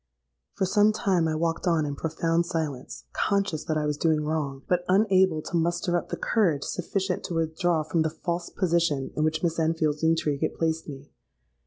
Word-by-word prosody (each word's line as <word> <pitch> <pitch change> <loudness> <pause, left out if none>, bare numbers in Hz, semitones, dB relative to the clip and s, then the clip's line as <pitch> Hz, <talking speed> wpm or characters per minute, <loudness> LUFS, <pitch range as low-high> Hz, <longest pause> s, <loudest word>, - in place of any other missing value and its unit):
"For 190 - +1
some 205 +3 +4
time 185 -5 +1
I 155 - -1
walked 165 +3 -1
on 165 -3 +2
in 145 -1 -3
profound 165 +2 0
silence, 150 - -4
conscious 200 -6 0
that 155 - 0
I 150 - 0
was 150 -1 -1
doing 160 -2 +2
wrong, 145 -3 -2
but 180 -1 +1
unable 190 -4 +3
to - - -5
muster 175 +1 0
up 175 - -2
the - - -3
courage 175 -11 +1
sufficient 185 +1 -2
to 170 - -4
withdraw 165 0 0
from 155 +2 0
the 160 - +1
false 170 +2 -4
position 170 -7 0
in 155 - 0
which 155 +1 0
Miss 165 -1 0
Enfield's 160 -2 0
intrigue 160 -3 +1
had - - -1
placed 160 -1 -1
me. 140 0 -10
165 Hz, 190 wpm, -26 LUFS, 155-175 Hz, -, some